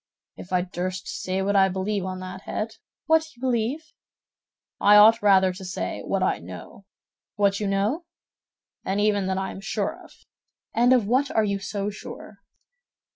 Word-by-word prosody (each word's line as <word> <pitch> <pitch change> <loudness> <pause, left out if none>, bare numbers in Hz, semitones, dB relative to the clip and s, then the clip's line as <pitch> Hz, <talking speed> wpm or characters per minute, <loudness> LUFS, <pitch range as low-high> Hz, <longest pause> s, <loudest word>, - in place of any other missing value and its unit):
"If 185 - -11
I 180 -1 +2
durst 185 +1 -4
say 190 +1 -2
what 200 +1 0
I 190 -1 +5
believe 190 +1 -2
on 185 0 -5
that 185 0 -7
head—" 220 +1 -4 0.3
"What 320 0 +2
you - - -22
believe?" 260 +6 -2 0.9
"I 205 +1 +6
ought 220 +2 +7
rather 190 -2 +4
to 190 +1 -10
say, 185 +1 -4
what - - -1
I - - +1
know." - - -11 0.5
"What 200 -1 +2
you 210 - -1
know?" 205 - 0 0.8
"And 195 +2 -1
even 205 -2 +2
what 190 0 -1
I 190 0 -2
am 190 - -9
sure 195 - -3
of." - - -16 0.6
"And 240 +2 +4
of 250 -5 +4
what 260 +6 +2
are 220 - +2
you 200 -1 -1
so 200 +1 -3
sure?" 200 0 -10
200 Hz, 175 wpm, -25 LUFS, 190-225 Hz, 0.9 s, ought